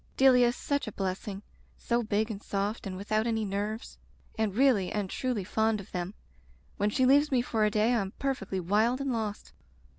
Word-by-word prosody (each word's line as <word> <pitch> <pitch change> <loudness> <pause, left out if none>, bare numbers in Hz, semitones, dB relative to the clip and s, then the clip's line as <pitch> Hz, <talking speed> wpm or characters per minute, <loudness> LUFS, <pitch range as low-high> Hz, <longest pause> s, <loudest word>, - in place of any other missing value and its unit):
Delia 255 -2 +6
is 240 - 0
such 285 -3 -2
a - - -4
blessing. 195 +1 -4 0.3
So 235 0 0
big 215 0 0
and 205 -1 -6
soft 200 +2 -2
and 185 -1 -5
without 215 +3 0
any 220 -2 0
nerves, 205 +3 -4 0.4
and 220 -3 -1
really 240 -8 +3
and 205 -2 -1
truly 245 0 -2
fond 220 +3 +1
of 195 - -11
them. 180 +2 -4 0.6
When 205 - +1
she 255 +5 +2
leaves 285 +3 +5
me 250 -2 +3
for 220 -3 +1
a - - +3
day 215 +3 +2
I 235 - +2
am 195 0 -5
perfectly 225 -9 -2
wild 215 +8 +2
and 275 -2 -1
lost." 215 -3 -4
215 Hz, 200 wpm, -29 LUFS, 200-245 Hz, 0.6 s, Delia